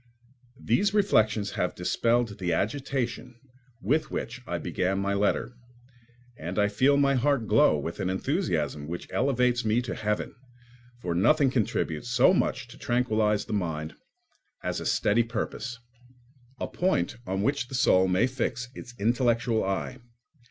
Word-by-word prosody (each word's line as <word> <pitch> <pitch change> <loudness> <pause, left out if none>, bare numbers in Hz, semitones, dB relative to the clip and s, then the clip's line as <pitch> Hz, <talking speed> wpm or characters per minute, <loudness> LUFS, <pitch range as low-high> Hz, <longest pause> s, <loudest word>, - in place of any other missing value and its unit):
These 200 - +1
reflections 110 - +2
have 90 - -2
dispelled 115 +4 0
the 90 -3 0
agitation 125 - -2 0.4
with 155 +9 +1
which 130 +3 -5
I - - -2
began 95 +1 -1
my 100 0 0
letter, 105 +4 0 0.8
and 85 +1 -6
I 105 -1 +3
feel 130 +7 +3
my 140 -1 +3
heart 135 -2 +1
glow 105 -8 +4
with 80 +3 -5
an 95 - -1
enthusiasm 95 - -1
which 85 +2 -6
elevates 125 -1 +2
me 110 +2 +2
to - - -4
heaven, 105 -2 -2 0.7
for 85 - -1
nothing 135 - +3
contributes 110 - -1
so 125 +8 +5
much 155 - 0
to 125 - -13
tranquillise 110 -4 +1
the - - -5
mind 80 -6 -2 0.7
as - - -2
a - - -4
steady 105 +3 +2
purpose—a 120 +2 -7
point 175 - 0
on 95 +1 -1
which 140 +1 0
the 130 - -6
soul 95 -6 +4
may 95 +6 +3
fix 125 -1 -3
its 120 -1 -10
intellectual 115 0 +1
eye. 95 +6 -3
115 Hz, 145 wpm, -27 LUFS, 100-130 Hz, 0.8 s, so